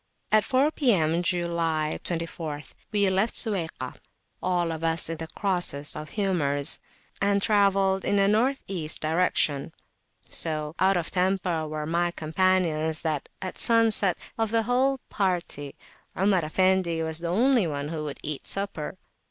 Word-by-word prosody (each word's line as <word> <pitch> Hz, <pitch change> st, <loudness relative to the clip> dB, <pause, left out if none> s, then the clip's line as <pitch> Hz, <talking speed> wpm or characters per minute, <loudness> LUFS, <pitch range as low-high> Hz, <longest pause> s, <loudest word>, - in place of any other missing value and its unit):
At 215 Hz, -1 st, +5 dB
four 265 Hz, +7 st, +2 dB
P.M. 175 Hz, -, +2 dB
(July 170 Hz, -3 st, -1 dB
24th) 165 Hz, -3 st, -5 dB, 0.2 s
we 205 Hz, -2 st, +2 dB
left 195 Hz, +5 st, +1 dB
Suwaykah, 165 Hz, -, -1 dB, 0.4 s
all 175 Hz, -2 st, 0 dB
of 160 Hz, 0 st, -5 dB
us 165 Hz, 0 st, +1 dB
in 165 Hz, -, -4 dB
the 160 Hz, -, -6 dB
crossest 175 Hz, -6 st, 0 dB
of 150 Hz, 0 st, -7 dB
humours, 150 Hz, -8 st, 0 dB, 0.4 s
and 200 Hz, 0 st, +2 dB
travelled 195 Hz, -2 st, +2 dB
in 205 Hz, -, +1 dB
a 200 Hz, -, +4 dB
N.E. 205 Hz, -, 0 dB
direction. 155 Hz, -3 st, +1 dB, 0.6 s
So 155 Hz, -2 st, -2 dB
"out 190 Hz, 0 st, +4 dB
of 170 Hz, -, -3 dB
temper" 180 Hz, -3 st, 0 dB
were 155 Hz, 0 st, -4 dB
my 170 Hz, +2 st, +1 dB
companions, 160 Hz, -2 st, +1 dB
that 155 Hz, -4 st, -2 dB
at 185 Hz, -, -5 dB
sunset, 225 Hz, -5 st, +5 dB, 0.2 s
of 225 Hz, -1 st, +1 dB
the 225 Hz, +1 st, +2 dB
whole 260 Hz, +4 st, +2 dB
party, 175 Hz, -7 st, -2 dB, 0.4 s
Omar 190 Hz, -3 st, +2 dB
Effendi 185 Hz, 0 st, +1 dB
was 160 Hz, 0 st, -2 dB
the 170 Hz, -, -4 dB
only 230 Hz, +3 st, +3 dB
one 145 Hz, -1 st, -4 dB
who 155 Hz, -1 st, -4 dB
would 145 Hz, -, -5 dB
eat 150 Hz, -2 st, -4 dB
supper. 195 Hz, -4 st, -2 dB
175 Hz, 145 wpm, -26 LUFS, 155-195 Hz, 0.6 s, At